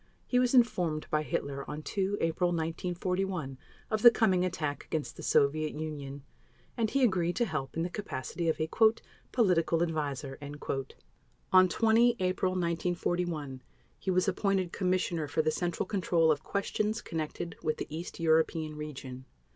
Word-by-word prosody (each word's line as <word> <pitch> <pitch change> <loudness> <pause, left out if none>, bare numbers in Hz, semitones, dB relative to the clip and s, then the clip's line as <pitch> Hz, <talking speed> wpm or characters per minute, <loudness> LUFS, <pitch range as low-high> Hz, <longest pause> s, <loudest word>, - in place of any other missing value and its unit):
He 250 - +2
was 250 +1 +2
informed 175 -11 +2
by 155 - +2
Hitler 140 -2 -3
on 150 +1 -5
2 195 +3 -1
April 165 +2 +1
1941 175 -2 -2 0.3
of 215 -1 0
the 240 - +11
coming 190 -6 +2
attack 155 -5 -2
against 155 -2 -3
the - - -9
Soviet 155 +2 +2
Union, 145 -3 -6 0.5
and 225 -3 0
he 275 +2 +1
agreed 180 -6 +2
to 240 - +2
help 155 - -4
in 165 - +1
the - - 0
capacity 170 -3 -3
of 155 -1 0
a 155 - 0 0.6
"Political 170 -7 +3
Adviser." 145 -4 -3 1.1
On 185 0 +7
20 230 +3 +4
April 185 0 0
1941 170 -5 -1 0.4
he - - -4
was 185 +1 +2
appointed 195 -2 0
Commissioner 180 -4 0
for 155 +2 0
the 155 - +2
Central 175 +3 -1
Control 175 -5 +2
of 150 -1 0
Questions 210 +4 -1
Connected 165 +1 -4
with 155 -1 -1
the - - -3
East 170 +2 -7
European 160 -1 +2
Region. 135 -4 -7
170 Hz, 150 wpm, -30 LUFS, 155-185 Hz, 1.1 s, the